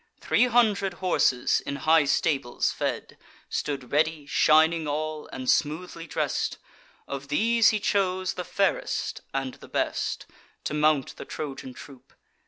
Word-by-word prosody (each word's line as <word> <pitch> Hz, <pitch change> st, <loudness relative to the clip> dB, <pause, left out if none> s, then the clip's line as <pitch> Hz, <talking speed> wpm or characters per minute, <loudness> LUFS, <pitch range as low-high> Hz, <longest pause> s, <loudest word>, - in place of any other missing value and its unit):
Three 250 Hz, -, +3 dB
hundred 210 Hz, -6 st, +2 dB
horses, 170 Hz, -9 st, +2 dB
in 140 Hz, -, -4 dB
high 155 Hz, +2 st, +4 dB
stables 140 Hz, -3 st, +1 dB
fed, -, -, -4 dB, 0.3 s
Stood 135 Hz, -4 st, -3 dB
ready, 155 Hz, 0 st, +1 dB
shining 160 Hz, +2 st, +4 dB
all, 155 Hz, +1 st, -3 dB
and 130 Hz, 0 st, -7 dB
smoothly 165 Hz, +4 st, 0 dB
dress'd: -, -, -1 dB, 0.5 s
Of 140 Hz, 0 st, -6 dB
these 225 Hz, +9 st, +4 dB
he 215 Hz, -, 0 dB
chose 185 Hz, -2 st, 0 dB
the 180 Hz, -, -4 dB
fairest 195 Hz, +2 st, -1 dB
and 135 Hz, -1 st, -3 dB
the -, -, -14 dB
best, -, -, -2 dB, 0.4 s
To -, -, -3 dB
mount 150 Hz, -2 st, +1 dB
the -, -, -8 dB
Trojan 135 Hz, -3 st, -6 dB
troop. 135 Hz, -3 st, -13 dB
155 Hz, 135 wpm, -26 LUFS, 140-185 Hz, 0.5 s, high